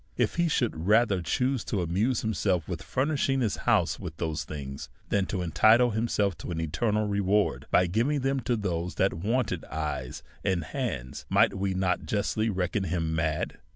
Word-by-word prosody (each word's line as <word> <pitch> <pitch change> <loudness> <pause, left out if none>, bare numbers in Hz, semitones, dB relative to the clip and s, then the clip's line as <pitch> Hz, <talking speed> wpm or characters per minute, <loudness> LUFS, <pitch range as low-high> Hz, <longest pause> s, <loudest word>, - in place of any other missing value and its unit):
If - - 0
he 170 0 +3
should 110 - -1
rather 105 -3 +4
choose 125 - 0
to 100 -5 -1
amuse 105 +9 0
himself 95 -6 0
with - - -4
fur 130 - -1
nishing 135 -3 +1
his 110 - 0
house - - +2
with 80 - -7
those 80 -3 -2
things, 70 -2 -7 0.2
than 100 -2 +1
to 95 -3 -2
entitle 110 +9 +5
himself 105 -3 0
to - - -7
an 85 -2 -3
eternal 105 +7 0
reward 100 0 +1
by 90 - +4
giving 120 - +1
them 135 +1 +1
to 125 0 0
those 90 -5 -2
that 95 - +2
wanted 105 0 -1
eyes 70 -4 -4 0.2
and 90 -3 0
hands, 70 - -4
might - - +4
we 95 -1 -1
not 95 -1 0
justly 110 0 0
reck 95 -3 -2
on 100 -2 +1
him 80 -2 -1
mad? 80 -1 -1
100 Hz, 185 wpm, -28 LUFS, 85-115 Hz, 0.2 s, entitle